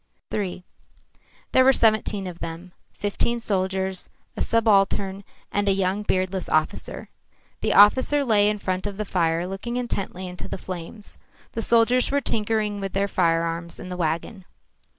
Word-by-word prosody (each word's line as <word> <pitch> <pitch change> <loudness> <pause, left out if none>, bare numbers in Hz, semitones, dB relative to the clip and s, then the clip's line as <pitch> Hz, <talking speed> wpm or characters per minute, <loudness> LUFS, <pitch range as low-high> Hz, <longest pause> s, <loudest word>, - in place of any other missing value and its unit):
III 185 -3 -3 0.9
There 260 - +5
were 265 - +7
seventeen 215 -4 +2
of 175 -2 -7
them, 165 +2 -7 0.2
fifteen 205 +3 -1
soldiers, 190 -3 -1 0.3
a - - -4
subaltern 200 -3 +2 0.3
and 205 0 +1
a - - +4
young 190 +1 0
beardless 185 -2 -1
officer. 155 0 -1 0.5
The - - 0
officer 260 +7 +5
lay 210 -3 +4
in 210 - -1
front 185 0 -2
of 200 -1 -6
the 215 - -2
fire 170 -2 0
looking 195 +6 -4
intently 195 -6 -3
into 180 0 -8
the - - -5
flames. 185 +3 -9 0.3
The 225 - -3
soldiers 235 +2 +3
were 285 - +2
tinkering 215 -4 0
with 195 -1 -4
the 200 +1 +1
firearms 170 -2 0
in 185 - -8
the 180 - -4
wagon. 170 +4 -2
195 Hz, 150 wpm, -24 LUFS, 185-215 Hz, 0.9 s, were